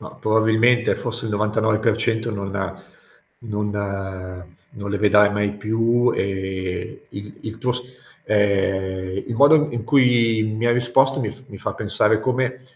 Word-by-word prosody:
Ma, - - -9
probabilmente 110 +2 +2
forse 120 -1 -5
il - - -3
99% 110 +2 0
non 100 -2 -4 0.9
non 100 -4 -4 0.3
non 100 0 -6
le 100 - -1
vedrai 105 0 +5
mai 105 0 -1
più 115 +4 +1
e 95 -1 -4
il 100 +1 -9
il 110 0 -7
tuo 125 +2 0
s 125 +1 -5 0.4
ehm, 95 -2 0
il 120 - -4
modo 150 +4 +5
in 120 -2 -4
cui 120 -4 +3
mi 110 +1 -2
hai 120 - +4
risposto 135 +3 +2
mi 110 -5 -2
f - - -14
mi 100 -4 -10
fa - - -4
pensare 105 +1 +1
come 130 +1 -1
110 Hz, 145 wpm, -21 LUFS, 100-120 Hz, 0.9 s, vedrai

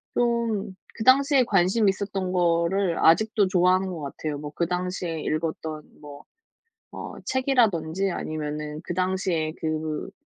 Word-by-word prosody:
좀 235 -5 0 0.2
그 220 - -5
당시에 275 +1 +5
관심 195 +2 +3
있었던 195 -1 -2
거를 175 +1 +1
아직도 205 +4 +4
좋아하는 185 +1 +3
것 170 -4 -6
같아요. 145 +1 -4
뭐 150 0 -7
그 170 - 0
당시에 180 -2 -3
읽었던 155 0 -3 0.2
뭐 145 -1 -11 0.7
어 - - -7
책이라든지 195 - +1
아니면은 150 -1 -4
그 - - -4
당시에 185 -3 -1
그 155 -1 -3
180 Hz, 275 characters per minute, -25 LUFS, 155-200 Hz, 0.7 s, 당시에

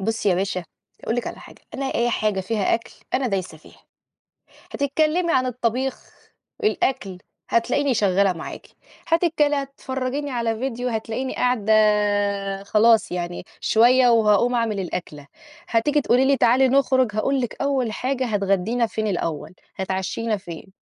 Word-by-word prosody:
بُصّي 220 +1 -1
يا 185 - +3
باشا 185 -1 -2 0.4
هاقول 230 - -2
لِك 245 - -2
على - - -6
حاجة، - - -15
أنا 275 0 -3
أي 240 +1 +1
حاجة 215 -3 0
فيها 205 +1 0
أكل 230 0 -5 0.2
أنا 260 0 +1
دايسة 190 -6 -3
فيها. - - -19 0.9
هتتكلّمي 310 +5 +1
عن 255 0 +2
الطَبيخ، 250 +1 -2 0.5
الأكل 260 - 0 0.3
هتلاقيني 265 +4 +1
شغاّلة 200 -3 +2
معاكِ، 165 - -8 0.4
هتتكل 325 -3 +2
هتفرَّجيني 275 0 -3
على 230 -2 -1
فيديو 250 0 -3
هتلاقيني 230 +3 -3
قاعدة 240 -4 +1 0.9
خلاص 220 +2 +3
يعني 175 0 -4 0.2
شوية 245 +2 +5
وهاقوم 230 +1 +3
أعمل 225 -4 0
الأكلة. 165 -5 -6 0.4
هتيجي 290 +6 +2
تقولي 255 0 +3
لي 275 0 +3
تعالي 255 +3 +4
نخرُج، 260 -2 +2
هاقول 270 +5 +1
لِك 245 - -5
أول 270 -5 0
حاجة 260 +3 -2
هتغدّينا 205 +2 0
فين 215 0 -3
الأول، 170 -5 -3 0.2
هتعشّينا 190 +4 -2
فين؟ 185 0 -10
230 Hz, 140 wpm, -22 LUFS, 200-260 Hz, 0.9 s, شوية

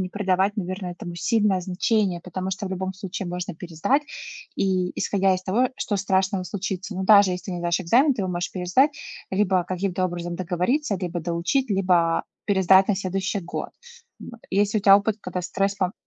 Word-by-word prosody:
не 185 - -2
придавать, 195 +1 0
наверно, 185 0 -4
этому 175 0 -7
сильное 205 0 +1
значение, 185 0 0
потому 185 +1 -5
что 195 +1 -4
в - - -6
любом 190 0 -3
случае 190 -1 -6
можно 180 0 -4
пересдать, 175 - 0 0.5
и 185 -2 +1
исходя 195 -1 +2
из 185 - -4
того, 240 +7 +2
что 205 - -2
страшного 190 -1 +1
случится. 190 0 -4
Но 190 - -2
даже 200 -2 +7
если 180 +1 -4
ты 190 - -4
не 175 - -3
сдашь 170 +1 +1
экзамен, 255 - +4
ты 205 - -3
его 185 - -2
можешь 175 0 -2
пересдать, 185 +11 +2 0.4
либо 190 -2 +2
каким-то 185 +1 -2
образом 175 -1 -5
договориться, 185 - 0
либо 175 -2 -4
доучить, 175 - -1
либо 180 -4 +2 0.2
пересдать 190 -1 +5
на 205 - +2
следующий 195 +1 -2
год, 170 - -5 0.5
вот. 235 -1 -11
И 190 - -2
если 205 +1 +2
ли - - -3
у - - -19
тя 195 0 +9
опыт, 210 +1 0
когда 180 0 -4
стресс 195 +3 -1
там 185 -1 0
190 Hz, 195 wpm, -24 LUFS, 180-200 Hz, 0.5 s, тя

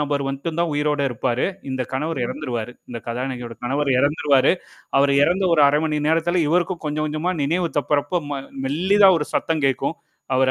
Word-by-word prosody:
நபர் 145 -1 -1
வந்ட்டு 140 +5 -4
தான் 170 -2 0
உயிரோட 150 0 0
இருப்பாரு. 120 +1 -1 0.2
இந்தக் 130 -1 -3
கணவர் 150 +1 -2
இறந்துருவாரு. 120 -1 -4 0.2
இந்தக் 115 -2 -8
கதாநாயகியோட 120 -1 -4
கணவர் 140 +3 0
இறந்துருவாரு. 140 -1 +3 0.5
அவர் 140 0 +4
இறந்த 185 +6 +2
ஒரு 155 - +4
1/2 150 +1 +1
நேரத்துல 165 +2 +2
இவருக்கும் 175 +2 0
கொஞ்சம், 150 +1 -1
கொஞ்சமா 155 +4 -1
நினைவு 170 +5 0
தப்பிறப்ப 145 +5 0
ம 140 -1 -3 0.3
மெல்லிதா 190 +8 +4
ஒரு 150 - -3
சத்தம் 160 -3 0
கேட்கும். 135 +4 -1 0.4
அவரு 130 0 +3
145 Hz, 160 wpm, -22 LUFS, 135-165 Hz, 0.5 s, அவர்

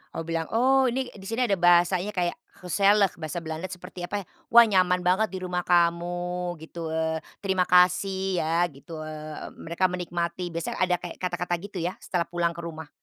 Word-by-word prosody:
Oh 165 - -3
bilang, 165 -1 -2
oh 265 +2 +4
ini, 255 +1 -2
di 195 -1 -11
sini 230 +3 0
ada 200 -7 +1
bahasanya, 175 +3 +4
kayak, 175 -1 0 0.3
"Huiselijk," 200 0 +3
bahasa 160 +1 -4
Belanda 160 +3 -4
seperti, 180 0 -8
apa 200 +2 -3
ya, - - -28 0.2
"Wah, 235 0 +8
nyaman 180 -4 +2
banget 190 +5 +3
di 190 - -4
rumah 180 -1 -2
kamu, 175 +1 +1
gitu, 165 0 -6
eee 160 0 -1 0.2
terima 190 -2 +1
kasih 190 +1 +3
ya," 165 +2 +2
gitu, 155 +3 -9
eee, 155 0 -7
mereka 170 +3 0
menikmati, 175 0 -3
biasanya 170 0 -3
ada 180 -1 +3
kayak 175 - -8
kata-kata, 180 -1 -2
gitu 200 0 -8
ya, 175 - 0
setelah 175 -2 -1
pulang 170 -1 -1
ke 170 - -6
rumah. 160 -2 -7
180 Hz, 185 wpm, -26 LUFS, 170-190 Hz, 0.3 s, Wah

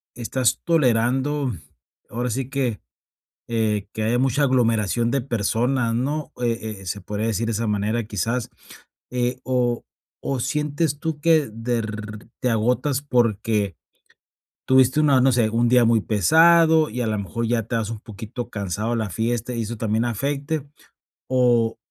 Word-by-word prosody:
estás 125 +1 0
tolerando, 135 -2 +1 0.6
ahora 120 +2 -2
sí 130 +3 -3
que, 130 -6 -1 0.7
eh, 105 -3 0
que 110 - -3
haya 120 +3 +1
mucha 135 +2 +2
aglomeración 115 -3 +2
de 140 - +1
personas, 120 +1 0
¿no?, 145 +5 -2
eh, 115 -3 -2
eh, - - -12
se 100 +3 -4
podría 105 +4 -3
decir 115 +1 -1
de - - 0
esa 115 +2 -1
manera, 105 +3 0
quizás, 115 +3 -2 0.6
eh, 125 0 -1
o 125 -2 0 0.4
o, 135 -2 -1
¿sientes 145 +3 -1
tú 160 -2 -3
que 160 -5 +3
de 115 +2 -2
r 105 -1 -6 0.2
te 125 - 0
agotas 125 +5 +1
porque 110 - 0 0.9
tuviste 130 +2 +4
una 140 -4 +4
no 130 +1 +4
sé, 115 -2 +2
un 115 +1 +1
día 125 -1 +5
muy 115 -1 +3
pesado 160 - +5
y, 125 +3 -5
a 120 - -1
la 110 -1 -1
mejor, 100 +4 -3
ya 115 -1 +1
te 115 +2 -4
vas 110 -2 -2
un 110 - -6
poquito 115 +2 -7
cansado 100 +2 -3
a - - 0
la 110 -2 -2
fiesta 115 +5 -2
y 115 - -1
eso 115 +2 -5
también 110 +1 0
afecte, 140 +5 -2 0.6
o 120 -3 +2
120 Hz, 160 wpm, -23 LUFS, 110-130 Hz, 0.9 s, día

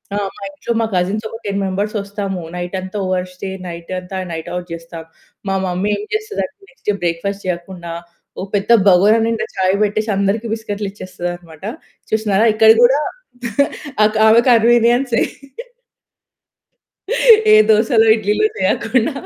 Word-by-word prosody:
ఆ! - - -1 0.2
మా - - -15
ఇంట్లో 195 +4 -4
మా 225 - +1
కజిన్స్ 190 +4 -1
ఒక 225 - -8
10 200 -1 -2
మెంబర్స్ 200 +3 -2
వస్తాము, 200 -2 -4
నైట్ 175 +1 -4
అంతా 185 +2 -6
ఓవర్‌‌‌స్టే 185 +1 -3 0.2
నైట్ 170 -1 -8
అంతా 185 +1 -7
నైట్ 160 -1 -5
అవుట్ 180 0 -4
చేస్తాం. 165 0 -8 0.4
మా 195 - 0
మమ్మీ 185 +3 -1
ఏం 205 - -6
చేస్తది 430 0 -2
అంటే, - - -14
నెక్స్ట్ 265 - -26
డే 210 - +3
బ్రేక్‌ఫాస్ట్ 175 +4 -2
చేయకుండా, 175 -1 -5 0.5
ఒక 195 - -5
పెద్ద 200 +2 -2 0.2
బగోరా 200 +4 +5
నిండా 230 -1 -1
చాయ్ 190 0 +2
బెట్టేసి 215 +2 -1
అందరికి 200 +4 0
బిస్కిట్లు 210 -2 -4
ఇచ్చేస్తదన్నమాట. 175 -4 -7 0.5
చూసినారా 220 0 +2
ఇక్కడ 220 +1 +6
కూడా, 265 +4 +5 1.1
అక్ 215 +1 0
ఆమె 225 +2 +6
కన్వీనియన్సే. 240 +1 +3 2.3
ఏ - - +9
దోసలో, 220 +1 +4
ఇడ్లీ‌లో 215 - +1
చేయకుండా 230 +7 +1
200 Hz, 140 wpm, -18 LUFS, 180-220 Hz, 2.3 s, ఏ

